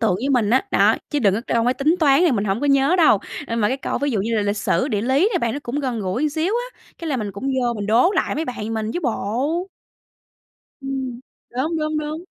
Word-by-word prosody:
tượng 220 -6 +2
với 235 +9 -2
mình 235 -6 +2
á. 260 +7 +3
Đó, - - +4 0.2
chứ 295 - 0
đừng 200 -8 +3
có 215 - -1
câu 230 -1 +1
mấy 250 +1 +2
tính 300 +5 +2
toán 280 -2 +5
thì 350 -4 +4
mình 210 -4 0
hổng 200 +2 -1
có 290 - 0
nhớ 275 +5 +3
đâu. 315 - +5 0.3
Ơ, 230 - -3
mà 210 -2 +2
cái 260 - -1
câu 270 - -3
ví 285 0 0
dụ 220 -6 0
như 225 +4 -1
là 215 - +1
lịch 205 +1 -1
sử, 260 +5 0
địa 210 -6 -1
lý 270 - +3
nè 365 - +1
bạn, 235 -7 -1
nó 280 - -3
cũng 260 +5 -3
gần 250 -5 -2
gũi 195 +6 -2
một 305 - +2
xíu 320 +6 -1 0.2
á, - - -30 0.2
cái 335 - -5
là 280 - 0
mình 210 -4 -4
cũng 200 +6 -8
vô 260 -3 0
mình 205 -2 -4
đố 235 - +4
lại 380 - 0
mấy 310 +3 -2
bạn 225 -5 -4
mình 220 0 -2
chứ 350 - -2
bộ. 275 - -1 1.1
Ừm, 265 -3 -4 0.3
đúng, 280 +7 -2
đúng, 310 0 -1
đúng. 305 +3 -5
260 Hz, 270 wpm, -21 LUFS, 220-295 Hz, 1.1 s, toán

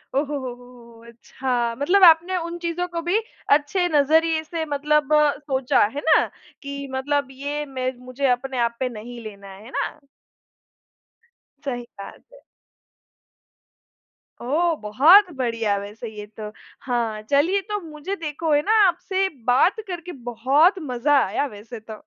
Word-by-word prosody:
ओहो, 280 - +3
हो, 290 0 -4
हो, 255 -2 -5
हो, 245 -1 -16
हो! 230 - -17
अच्छा। 240 0 -3
मतलब 370 +7 +3
आपने 340 +2 +6
उन 340 0 -4
चीज़ों 345 +1 -2
को 340 -1 -4
भी 350 +5 +1 0.3
अच्छे 305 +5 +3
नज़रिए 320 +2 +3
से 325 +1 -4
मतलब 295 0 0 0.3
सोचा। 265 -3 +1
है 290 - -3
ना? 315 - +4 0.4
कि 280 0 -6
मतलब 280 +1 -1
ये 290 +2 -4
मे 260 -2 -3
मुझे 255 +2 -2
अपने 255 +1 -1
आप 235 - -10
पे 255 - -1
नहीं 235 +1 -9
लेना 200 -2 -10
है, 195 +2 -12
है - - -11
ना? - - -3 1.7
सही 245 -3 -3 0.2
बात 195 - -10
है। - - -15 2.0
ओह! 325 +7 +1
बहुत 315 - +6
बढ़िया 230 -5 0
वैसे 210 +3 -8
ये 210 -1 -9
तो। 210 -1 -6 0.3
हाँ, 230 -4 -2
चलिए 290 - +2
तो 415 0 -1
मुझे 315 +4 -6
देखो 315 -1 -3
है 290 - +4
ना, 415 - -1 0.2
आपसे 380 +2 0 0.2
बात 270 - +3
करके 355 -1 -6 0.2
बहुत 270 - +3
मज़ा 285 +1 +1
आया 290 - -1
वैसे 220 +3 -10
तो। 220 0 -10
280 Hz, 150 wpm, -23 LUFS, 240-325 Hz, 2.0 s, आपने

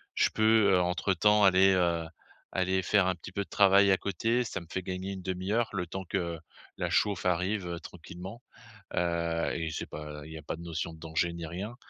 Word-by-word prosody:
je - - +3
peux, 110 -1 +4
heu, 90 - +4
entre 90 +2 0
temps 105 +4 +4
aller, 95 0 +6
heu, 85 -3 +1 0.5
aller 95 0 +1
faire 100 +1 +3
un 95 - +2
petit 85 - -10
peu 100 +2 -2
de - - -20
travail 100 0 +5
à 95 - +4
côté, 115 +7 0
ça 105 -4 -4
me - - -12
fait 95 - -2
gagner 95 +1 -4
1/2 95 +5 -1
le 90 -3 -1
temps 95 +2 -6
que 85 -3 -2 0.4
la - - -1
chauffe 100 -6 +1
arrive, 90 +2 0
heu, 85 -1 -4
tranquillement». 90 +6 -10 0.5
Heu, 85 -1 0
et 80 -1 -3
c'est - - -4
pas 75 -1 -7
il 80 - -10
y 80 - -6
a - - -11
pas 75 - -5
de 85 - -10
notion 85 0 -4
de - - -14
danger, 80 +1 -1
ni 85 -1 -5
rien. 95 +8 -6
90 Hz, 215 wpm, -29 LUFS, 85-100 Hz, 0.5 s, aller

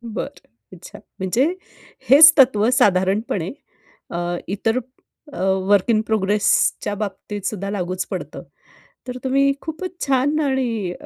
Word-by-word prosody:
बरं. - - -7 0.3
अच्छा. 180 0 -12 0.2
म्हणजे 200 +9 +1 0.6
हेच 305 +3 +9
तत्व 240 -5 +4
साधारणपणे 190 -2 +1 0.6
अ, 170 - -4 0.3
इतर 220 +5 -1 0.6
अ, - - -8 0.3
वर्क 205 +2 +3
इन 215 -1 +3
प्रोग्रेसच्या 205 0 +1
बाबतीत 205 0 -6
सुद्धा 200 -1 -3
लागूच 185 -2 -3
पडतं. - - -6 0.7
तर 250 - -5
तुम्ही 275 +1 +2
खूपच 330 +3 -6 0.2
छान 275 +3 +1
आणि 240 -9 -1
215 Hz, 115 wpm, -20 LUFS, 195-265 Hz, 0.7 s, हेच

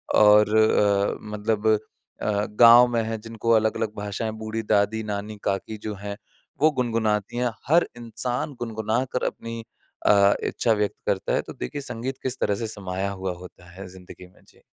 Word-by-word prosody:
और 105 0 +6
अ, 100 -2 +3
मतलब 105 0 -2 0.5
अ, 105 0 0
गाँव 120 +1 +9
में 115 - +2
हैं 110 0 -4
जिनको 115 +1 -3
अलग-अलग 110 -1 +1
भाषाएँ 105 +2 -3
बूढ़ी 110 +1 -4
दादी 105 +2 +1
नानी 105 0 -5
काकी 100 +2 -2
जो 105 - -3
हैं 100 0 -5 0.4
वो 155 - +6
गुनगुनाती 115 -3 0
हैं 125 -1 0 0.2
हर 170 +4 +4
इंसान 120 +4 -3
गुनगुना 110 +1 -1
कर 125 - -2
अपनी 115 0 -5 0.4
अ, 100 -1 +5
इच्छा 115 - 0
व्यक्त 105 -1 -1
करता - - -1
है - - +2
तो - - -10
देखिए 105 - -5
संगीत 125 +1 -5
किस 130 -1 -2
तरह 100 - +1
से 115 +2 -4
समाया 95 -2 -3
हुआ 95 -1 -4
होता 90 -1 -14
है 95 +2 -9
ज़िंदगी 90 0 -13
में 90 - -24
जी। - - -23
110 Hz, 170 wpm, -24 LUFS, 100-115 Hz, 0.5 s, गाँव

